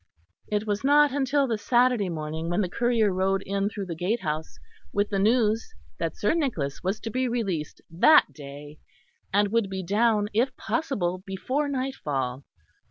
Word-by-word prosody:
It 210 0 -1
was 205 +1 -2
not 290 +1 +5
until 280 +1 +1
the 225 -4 -2
Saturday 240 -3 +2
morning 160 0 -4
that 175 - 0
the 185 - -1
courier 230 -1 +1
rode 190 +1 0
in 200 +1 -1
through 205 -2 -5
the 175 - -5
gatehouse 165 -4 -2 0.3
with 205 +1 0
the 200 - 0
news 220 - +2 0.2
that 165 -2 -2
Sir 210 - +1
Nicholas 225 - -2
was 190 +3 -1
to 225 - -5
be 255 +3 0
released 195 -11 -3
that 300 - +5
day, 145 +1 -10 0.5
and 205 +1 +3
would 225 -2 +1
be 190 -1 -4
down 210 +2 +2
if 255 +4 +1
possible 200 - -1
before 255 +10 -2
nightfall. 145 - -3
205 Hz, 165 wpm, -26 LUFS, 175-245 Hz, 0.5 s, not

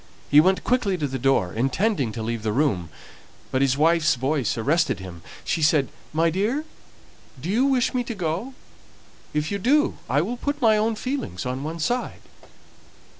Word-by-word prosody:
He 145 +1 +8
went 190 +3 +2
quickly 235 -7 +1
to 150 - -1
the 135 0 -4
door, 125 -9 +2
intending 135 - 0
to 110 - -5
leave 115 0 -3
the 110 0 -1
room; 105 - 0 0.6
but 130 - +1
his 135 -1 +2
wife's 160 0 +3
voice 130 0 -1
arrested 140 - +1
him; 90 -3 -9 0.2
she 165 - -1
said, 150 -3 +3 0.2
"My 165 +2 +2
dear, 215 - 0 0.8
do 165 +8 -3
you 240 +6 +3
wish 265 -2 +2
me 250 -1 0
to 235 - -5
go? 185 +9 -3 0.8
if 150 +3 -1
you 200 - -1
do, 290 +9 +2
I 145 +3 +3
will 240 +7 -4
put 285 +3 -3
my 225 -5 +4
own 220 +1 +1
feelings 250 - -4
on 130 +1 -3
one 160 +2 -4
side." 245 +10 -2
160 Hz, 175 wpm, -24 LUFS, 130-220 Hz, 0.8 s, He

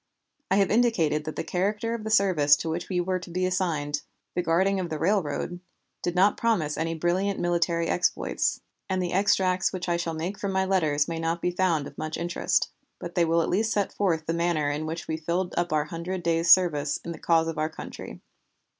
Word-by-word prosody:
I 190 - +3
have 195 -1 +3
indicated 170 -11 +2
that 155 - -5
the - - -3
character 210 +5 -1
of 230 -2 -4
the 220 - -4
service 185 -9 +5
to 160 - -4
which 170 +2 -4
we 180 -2 0
were 185 +1 0
to 180 - -10
be 185 +2 -1
assigned, 155 -6 -1 0.3
the 180 - 0
guarding 190 +4 +2
of 180 -2 -3
the 155 - -3
railroad, 175 -1 -1 0.4
did 175 - -2
not 195 +3 +4
promise 185 -11 +1
any 165 0 -2
brilliant 185 +4 0
military 170 -1 +1
exploits, 60 - 0 0.3
and 185 - 0
the 180 -1 -2
extracts 185 -1 +2
which 185 -2 -5
I 170 -1 +1
shall 165 -1 -3
make 175 +5 -4
from 200 -1 -2
my 190 0 +2
letters 155 -6 +1
may 165 -1 -3
not 165 +1 -1
be 180 - 0
found 175 -5 +1
of - - -10
much 155 0 -3
interest, 175 +1 0 0.3
but - - -7
they 175 -2 +3
will 165 0 +2
at - - -2
least 220 +4 +1
set 205 -2 0
forth 165 -6 0
the 165 - -1
manner 170 -4 +1
in 150 +2 -3
which 165 +1 -5
we 160 - -2
filled 170 +3 -2
up 175 0 0
our 150 -1 +1
Hundred 170 +3 -5
Days' 165 0 +1
service 150 -6 +5
in 170 - -4
the 165 - -8
cause 165 -1 +2
of 165 -1 -3
our 155 0 0
country. 160 - -9
175 Hz, 220 wpm, -26 LUFS, 160-185 Hz, 0.4 s, service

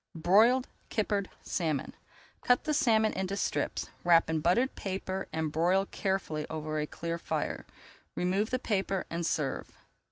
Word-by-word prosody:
BROILED 220 +10 +4 0.2
KIPPERED 205 -3 0
SALMON 155 -6 -1 0.5
Cut 245 0 +3
the 305 - 0
salmon 225 -7 +3
into 190 +1 -2
strips, - - -1
wrap 165 -2 +5
in 160 - +1
buttered 185 - +2
paper, 190 0 -4
and 160 -1 -1
broil 180 +5 +2
carefully 190 -7 -2
over 155 -1 -3
a 150 - -1
clear 170 +2 -4
fire. - - -3 0.5
Remove 195 +5 +1
the 255 - +1
paper 195 -5 -1
and 170 +1 -2
serve. 145 -4 -2
190 Hz, 140 wpm, -30 LUFS, 160-210 Hz, 0.5 s, wrap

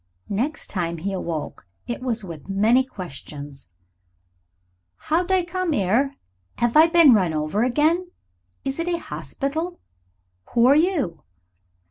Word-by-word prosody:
Next 260 +11 -1
time 170 -3 -2
he 195 +5 -3
awoke 165 - -5 0.2
it 240 - -4
was 240 -4 -2
with 165 -1 -9
many 220 +7 +4
questions. 145 - -9 1.3
"How'd 345 - 0
I 370 -2 +3
come 355 -3 -1
'ere? 235 +9 +1 0.4
'Ave 240 +5 +4
I 320 - +8
bin 335 -5 +7
run 180 -7 +2
over 155 +8 0
agen? 315 +8 +2 0.6
Is 270 +3 -3
it 335 - -1
a 345 -1 +1
hospital? 320 +2 -4 0.8
Who 235 0 +5
are 270 +3 +6
you?" 305 - +1
245 Hz, 130 wpm, -23 LUFS, -, 1.3 s, I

